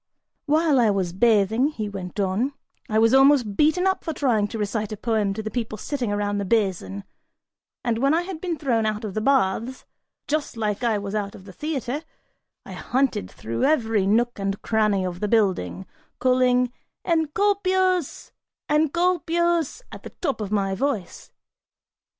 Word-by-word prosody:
"While 305 -2 +3
I 230 -3 +4
was 190 -4 -1
bathing," 220 +4 +3
he 220 -9 -4
went 195 -1 -7
on, 205 +8 0 0.4
"I 215 - +1
was 225 +2 +4
almost 270 -6 +5
beaten 315 - +3
up 380 0 +1
for 325 - -3
trying 230 -9 +1
to 225 - -6
recite 210 0 -2
a 215 - -4
poem 215 -3 0
to 220 - -4
the 215 - -4
people 225 -3 -3
sitting 245 0 -3
around 205 0 -1
the - - -1
basin, 185 - -1 0.8
and 230 -2 0
when 275 +3 +3
I 335 +3 +2
had 350 -3 -7
been 350 -3 -2
thrown 235 -7 +1
out 215 +1 -2
of 200 - -5
the 215 - -2
baths, 250 0 +1 0.4
just 295 -5 -2
like 210 0 -2
I 230 -3 +2
was 200 0 -5
out 205 -2 -3
of 190 - -13
the 190 - -11
theatre, 290 - -3 0.6
I - - -10
hunted 255 - -1
through 115 +4 -4
every 225 -9 +2
nook 235 +2 +1
and 195 0 -2
cranny 215 -4 +1
of 180 -1 -4
the 210 - -1
building, 190 - +1 0.3
calling 250 -1 +2 0.3
'Encolpius, 370 +1 +1 0.4
Encolpius,' 340 - +1
at - - -9
the - - -9
top 275 -9 -2
of 205 -1 -4
my 195 -2 0
voice. 215 -3 -3
230 Hz, 170 wpm, -24 LUFS, 205-290 Hz, 0.8 s, almost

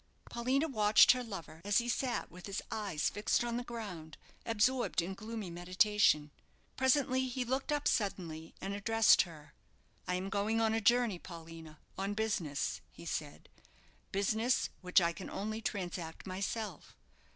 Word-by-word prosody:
Paulina 260 +6 +1
watched 215 -6 +6
her 250 0 0
lover 170 -8 -8
as 205 0 +2
he 240 - +1
sat 245 +1 -1
with 180 +2 -10
his 195 - -3
eyes 195 -8 -1
fixed 205 +3 +1
on 235 0 -2
the 245 - -3
ground, 200 -10 -7 0.3
absorbed 235 +2 +2
in 175 +3 -1
gloomy 215 -2 -6
meditation. 180 -3 +3 0.4
Presently 260 0 +2
he 250 0 -2
looked 265 +4 -1
up 295 -1 +1
suddenly, 170 -6 -2
and 195 +1 -4
addressed 225 +2 +5
her. 150 -2 -14 0.5
"I 180 - 0
am 185 +2 -3
going 205 +3 0
on 220 -1 +2
a 225 - +1
journey, 235 -4 +3
Paulina, 165 -3 -10 0.2
on 200 +1 -1
business," 205 -10 -1
he - - -12
said; - - -5 0.6
"business, 220 +5 +1
which 180 +1 +4
I 170 -1 +1
can 185 - -8
only 215 +3 -4
transact 175 -6 -4
myself. 195 0 -4
205 Hz, 150 wpm, -33 LUFS, 180-235 Hz, 0.6 s, watched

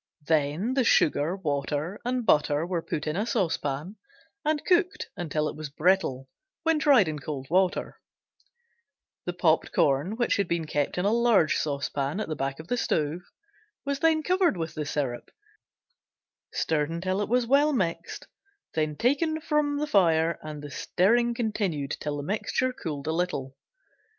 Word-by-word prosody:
Then 160 - +1
the 265 -1 +2
sugar, 160 -5 +3
water, 150 +1 -2
and 245 -1 -1
butter 150 -3 +3
were 175 -1 -2
put 150 -2 -4
in 155 0 -2
a 210 +5 -1
saucepan 160 - -1 0.5
and 305 -1 0
cooked 360 0 +1
until 155 -3 -1
it - - -5
was 155 -1 -6
brittle, 150 -4 +1 0.4
when 325 -1 +2
tried 275 - +5
in 155 -1 -3
cold 140 -2 -5
water; 185 0 +1 1.3
the 175 - -2
popped 165 -2 +2
corn, 145 +9 +2
which 240 +1 +1
had 200 -2 0
been 170 -1 -1
kept 145 0 -1
in 180 - 0
a 205 - +3
large 230 -9 +4
saucepan 140 +2 -2
at 160 -7 -3
back 135 0 -3
of 160 - -9
the 245 - 0
stove, 155 -5 0 0.6
was 280 0 -1
then 315 0 +3
covered 360 - +2
with 165 -1 -4
the 150 -1 -4
syrup, 125 -6 -3 1.2
stirred 150 -2 0
until 185 +4 -2
it 205 - -2
was 245 +1 +2
well 285 +5 +4
mixed, 185 - -2 0.5
then 155 -1 -1
taken 300 - +1
from 300 -2 0
fire 170 - +3
and 150 -1 -7
the 145 - -8
stirring 235 +10 +2
continued 200 - -2
till 145 -1 -3
the 145 - -4
mixture 220 - -1
cooled 150 - -5
a 160 - 0
little. 160 -6 -2
175 Hz, 160 wpm, -27 LUFS, 150-235 Hz, 1.3 s, tried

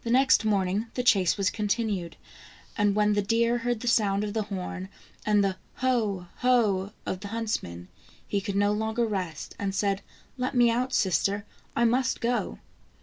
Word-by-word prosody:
206 255 +3 +5
THE 220 - -3
ENCHANTED 205 -2 +1 0.6
FA 205 - 0
WN 210 +1 +3
deer 235 +1 +2
heard 240 -1 -1
the 245 - -5
sound 205 -3 +2
of 205 -1 -3
the 220 - 0
horn, 190 -2 -5 0.4
and 210 -1 +4
the 190 -1 0
" - - -36
Ho! 215 -8 +1
ho!'' 215 -6 +2
of 185 - -3
the 200 - -7
huntsmen, 200 - -3 0.4
he 200 - -1
could 200 -1 -4
no 205 +1 +3
longer 220 +2 0
rest, 185 -8 -4
and 195 -1 -2
said: 200 -1 0 0.2
" - - -33
Let 255 +1 -1
me 240 -1 +5
out, 250 +3 0
sister, 200 0 +1 0.3
I 235 - +3
must 250 +2 +1
go." 240 +1 -1
210 Hz, 160 wpm, -27 LUFS, 195-235 Hz, 0.6 s, 206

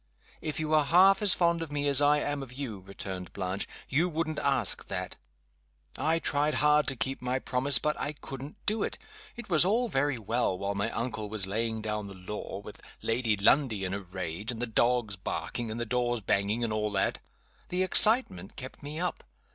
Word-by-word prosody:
"If 155 -1 -3
you 155 -1 -2
were 155 -1 +3
half 190 +5 +5
as 205 -3 +7
fond 170 -1 +2
of 160 -3 -5
me 145 0 -1
as 140 0 +5
I 145 +1 +5
am 145 -1 -2
of 135 -3 -8
you," 130 -6 -5
returned 95 -1 -7
Blanche, 95 0 -3 0.2
"you 160 +7 +1
wouldn't 155 -2 -2
ask - - +1
that. - - -4 0.8
I 160 +2 +1
tried 150 -1 0
hard 150 0 +3
to 135 - 0
keep 130 +3 -3
my 125 +1 -1
promise, 125 +2 +2
but 150 +4 0
I 145 - -3
couldn't 140 0 -9
do 215 +1 0
it. - - -2 0.4
It 240 - -8
was 170 -4 +6
all 230 +6 +1
very 140 -4 +1
well, 115 -3 -1
while 100 +1 -2
my 100 +2 -1
uncle 115 -3 -4
was 105 -2 +2
laying 110 +2 -2
down 105 -1 -3
the 100 - -10
law 95 +1 -6
with 105 - -10 0.2
Lady 115 -2 +1
Lundie 110 0 +3
in 90 - -3
a 100 - -2
rage, 95 +2 -4
and 115 - -7
the 120 - 0
dogs 120 -2 +1
barking, 115 +4 -4
and 110 +2 -4
the 120 - -1
doors 120 0 0
banging, 100 +4 0
and 110 -2 0
all 105 -1 -1
that. 95 - 0 0.5
The 180 +1 +1
excitement 185 - +4
kept 130 0 -9
me 150 +2 -6
up. 180 -1 -3
125 Hz, 205 wpm, -29 LUFS, 105-150 Hz, 0.8 s, as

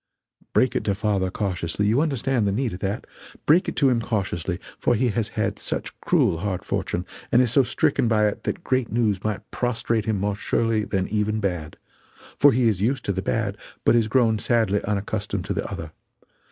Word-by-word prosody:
Break 130 - +3
it - - 0
to 100 - +1
father 100 -2 0
cautiously 90 -1 -2
you 115 +7 +3
understand 135 -7 0
the - - +2
need 115 +2 -1
of 90 - -6
that 100 +2 -3 0.4
break 165 +5 +4
it - - -6
to 140 - +4
him 120 -2 +2
cautiously, 95 -6 -2 0.2
for 120 - +2
he 125 +2 +2
has 110 0 -1
had - - 0
such - - -4
cruel 80 - +2
hard 95 0 -3
fortune, 90 +1 -2 0.3
and 120 - +5
is 125 -3 +3
so 135 - +5
stricken 120 -1 +1
by 105 -2 +3
it 105 - -4
that 175 - -3
great 130 -2 +1
good - - -10
news 105 -5 +1
might 110 -2 -3
prostrate 115 -2 -1
him 110 -3 0
more 100 +1 0
surely 110 +1 0
than 95 -1 -1
even 105 +1 0
bad, 90 -7 -3 0.6
for 145 - +6
he 125 -1 +2
is 100 -4 +1
used 130 +6 0
to 100 - 0
the 95 - -2
bad 100 0 -1 0.3
but - - +5
is 115 -2 +3
grown 110 -2 +3
sadly 110 -3 +1
unaccustomed 100 0 -2
to - - -2
the - - -3
other. 80 -1 -6
110 Hz, 205 wpm, -24 LUFS, 100-120 Hz, 0.6 s, for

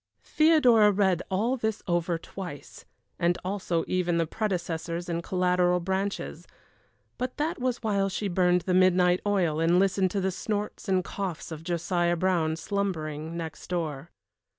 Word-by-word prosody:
Theodora 255 -10 +5
read 190 -3 +2
all 220 +7 0
this 220 -2 -2
over 175 -1 0
twice, 175 -4 -9 0.3
and 175 +1 +2
also 185 -4 -1
even 180 -2 0
the 165 - +2
predecessors 175 -3 -3
and 170 -1 -2
collateral 180 0 +2
branches 190 +3 -3 0.7
but 255 0 -3
that 305 +2 -1
was 250 -1 -2
while 200 -3 +1
she 200 +2 -2
burned 180 -1 +2
the 185 - -1
midnight 180 -1 +4
oil 175 -7 +1
and 165 +2 +3
listened 190 0 +2
to 200 - -2
the 190 0 0
snorts 210 +2 -4
and 185 -1 +2
coughs 180 -3 -5
of 160 0 -7
Josiah 175 0 0
Brown, 165 -3 +1
slumbering 165 -4 -3
next 165 -1 -7
door. 160 -4 -3
180 Hz, 150 wpm, -27 LUFS, 170-200 Hz, 0.7 s, Theodora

